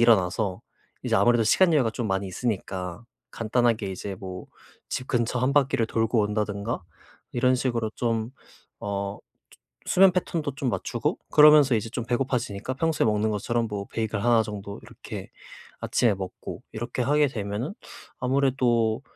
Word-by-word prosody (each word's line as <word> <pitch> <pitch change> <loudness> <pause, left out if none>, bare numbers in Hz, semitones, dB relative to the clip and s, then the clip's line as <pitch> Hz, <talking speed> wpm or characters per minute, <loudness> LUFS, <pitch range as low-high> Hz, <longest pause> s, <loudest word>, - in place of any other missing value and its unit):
일어나서 100 -4 +3 0.4
이제 - - 0
아무래도 120 -1 +4
시간 175 - +4
여유가 130 -7 +3
좀 110 0 -3
많이 95 +1 -1
있으니까 95 -2 -4 0.3
간단하게 115 -2 0
이제 95 +1 -5
뭐 90 -1 -8 0.4
집 125 - -3
근처 125 0 0
1 130 +2 +2
바퀴를 135 -5 +2
돌고 115 0 +1
온다든가 105 +1 -2 0.5
이런 125 +1 +3
식으로 120 -4 -1
좀 115 -1 -1 0.5
어 100 0 -3 0.3
조 - - -20 0.3
수면 190 0 +6
패턴도 165 -5 -2
좀 140 -4 -1
맞추고 - - -2
그러면서 150 -4 +7
이제 115 +1 -2
좀 120 -1 -4
배고파지니까 125 -2 -2
평소에 160 +2 +1
먹는 105 0 +1
것처럼 115 +3 -1
뭐 100 -1 -4
베이글 110 -2 -3
1 120 -2 +5
정도 100 -1 -7
이렇게 - - -9 0.5
아침에 115 -4 +2
먹고 95 -1 -7
이렇게 120 +3 -3
하게 145 +4 +3
되면은 110 - -4 0.5
'아무래도 125 -3 +2
115 Hz, 330 characters per minute, -26 LUFS, 105-130 Hz, 0.5 s, 그러면서